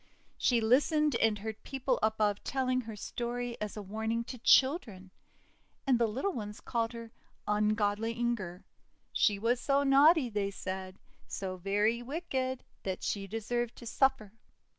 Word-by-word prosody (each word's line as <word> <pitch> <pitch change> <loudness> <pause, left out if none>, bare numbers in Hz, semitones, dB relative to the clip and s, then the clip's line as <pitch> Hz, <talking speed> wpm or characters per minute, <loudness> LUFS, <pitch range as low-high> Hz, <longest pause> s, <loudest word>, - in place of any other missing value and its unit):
She 240 -2 +2
listened 295 +6 +3
and 220 -2 +2
heard 220 +1 -6
people 265 -2 -1
above 215 -1 +1
telling 255 -1 0
her 225 -2 -8
story 240 +3 -4
as 210 0 -4
a 210 - -5
warning 220 +3 -2
to 250 +1 -8
children. 230 - +3 0.7
And 260 -4 +3
the 235 - +3
little 270 - -2
ones 210 -4 -6
called 230 0 -2
her 230 -1 -8 0.3
"un 210 +1 +2
godly 215 +1 0
Inger." 230 -7 -3 0.5
"She 205 -2 +3
was 235 +4 +1
so 280 0 +2
naughty," 280 +1 +6
they 205 -3 -1
said, 190 -1 -6 0.3
;<so 190 -1 -4
very 205 +5 +1
wicked, 260 -2 -3 0.2
that 190 -1 -4
she 195 -1 -2
deserved 230 +3 -2
to - - -11
suffer." 235 -4 +1
230 Hz, 150 wpm, -31 LUFS, 210-255 Hz, 0.7 s, naughty